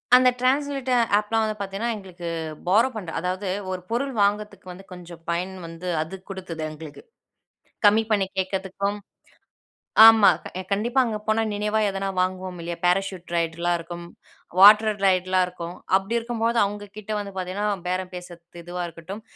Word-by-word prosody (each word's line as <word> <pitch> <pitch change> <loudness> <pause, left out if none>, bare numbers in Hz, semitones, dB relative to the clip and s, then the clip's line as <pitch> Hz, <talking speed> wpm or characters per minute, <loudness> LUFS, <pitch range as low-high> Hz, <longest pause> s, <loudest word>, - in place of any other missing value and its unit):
அந்த 255 0 +6
டிரான்ஸ்லேட் 270 0 0 0.3
ஆப்லாம் 220 +1 0
வந்து 215 0 -1
பார்த்தீங்கன்னா 200 +4 -2
எங்களுக்கு 180 -4 -9 0.4
பாரோ 225 +8 +4
பண்ற 185 -6 -5
அதாவது 185 +3 -3 0.2
ஒரு 185 -1 -4
பொருள் 270 +4 -1
வாங்குறதுக்கு 205 -1 -1
வந்து 180 +2 -11
கொஞ்சம் 175 -2 -11
பயன் 180 +3 -2
வந்து 165 +2 -8
அது 160 +5 -5
குடுத்துது 185 -4 -6
எங்களுக்கு 155 -1 -10 0.9
கம்மி 210 +2 +5
பண்ணி 200 -3 +2
கேட்கிறதுக்கும். 190 +2 -2 1.1
ஆமா 225 -3 +9 0.4
கண்டிப்பா, 235 +6 +1
அங்க 220 -3 -2
போனா 220 +1 +2
நினைவா 210 +1 0
எதனா 195 0 -3
வாங்குவோம் 185 0 -2
இல்லையா 170 0 -4
பேராசூட் 180 0 0
ரைட்லாம் 170 +1 0
இருக்கும், 170 +1 -8 0.5
வாட்டர் 210 +1 +7
ரைட்லாம் 185 0 +3
இருக்கும் 175 -1 -7 0.2
அப்டி 195 +4 -1
இருக்கும்போது 230 0 -1
அவங்க 205 +1 -5
கிட்ட 215 0 -9
வந்து 200 -1 -5
பார்த்தீங்கன்னா 190 +3 -2 0.2
பேரம் 185 0 -2
பேசுறத்து 175 -1 -10
இதுவா 175 +1 -5
இருக்கட்டும். 175 +6 -9
190 Hz, 145 wpm, -24 LUFS, 180-215 Hz, 1.1 s, ஆமா